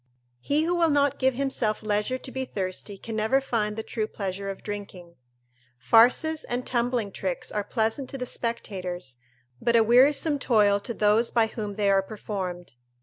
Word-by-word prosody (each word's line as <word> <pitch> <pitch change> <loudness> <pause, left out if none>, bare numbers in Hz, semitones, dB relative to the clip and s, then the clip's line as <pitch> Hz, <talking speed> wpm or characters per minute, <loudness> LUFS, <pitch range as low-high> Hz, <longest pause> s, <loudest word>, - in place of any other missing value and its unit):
He 290 - +1
who 340 +2 0
will 340 -2 +3
not 285 -1 +2
give 260 -1 +2
himself 250 -5 -1
leisure 210 +4 0
to 260 - -9
be 265 0 -3
thirsty 195 -3 -4
can 225 +3 -7
never 220 +5 +2
find 215 -6 -1
the 220 - -3
true 220 -1 -3
pleasure 195 -1 -4
of 195 - -7
drinking. 200 -4 -7 0.6
Farces 245 - +4
and 245 +1 -3
tumbling 240 -3 -1
tricks 185 -2 -4
are 210 - -1
pleasant 225 +5 -1
to 275 - -5
the 250 - -4
spectators, 185 - -4 0.4
but 235 - +2
a 230 - +6
wearisome 275 +6 +4
toil 210 -5 +3
to 230 +3 -6
those 215 +3 +3
by 230 -2 +3
whom 215 -2 -5
they 200 -1 +2
are 195 0 +4
performed. 190 - -6
220 Hz, 175 wpm, -26 LUFS, 200-255 Hz, 0.6 s, a